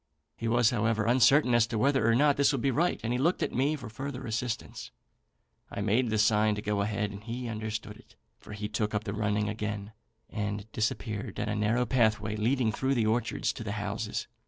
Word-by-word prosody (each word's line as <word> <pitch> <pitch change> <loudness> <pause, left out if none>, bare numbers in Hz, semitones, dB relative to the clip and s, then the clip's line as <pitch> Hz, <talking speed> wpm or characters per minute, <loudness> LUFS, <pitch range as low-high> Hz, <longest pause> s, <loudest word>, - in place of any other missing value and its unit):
He 115 - -4
was, 120 0 +3
however, 110 -2 +1
uncertain 125 +2 +5
as 120 -1 +4
to 115 -2 -3
whether 135 -1 +3
or 115 - +4
not 145 +2 +4
this 140 +1 +3
would 135 -4 -1
be 135 - +3
right, 170 +7 +1
and 115 +1 -1
he 125 - 0
looked 170 +7 +2
back - - 0
to - - -8
me 140 +4 +2
for 125 -5 -8
further 130 +4 -6
assurance. 115 +1 -4 0.8
I - - -5
made 110 +4 +2
the 110 - 0
sign 105 0 +3
to 105 - -4
go 105 -1 0
ahead, 105 0 -1
and 100 +1 -9
he 120 +2 -5
understood 110 -1 -5
it, - - -20 0.2
for - - -11
he 105 0 -4
took 105 0 -2
up 105 - -1
the 100 -2 -4
running 105 0 0
again, 105 -1 -4 0.4
and 105 -1 -3
disappeared 110 -2 -2
down 105 +1 -2
a 105 - -1
narrow 110 +4 +1
pathway 110 -4 +1
leading 115 +2 +1
through 135 +4 0
the 115 -3 +2
orchards 115 +1 0
to - - -7
the 105 -2 -3
houses. 105 0 -3
110 Hz, 220 wpm, -29 LUFS, 105-125 Hz, 0.8 s, uncertain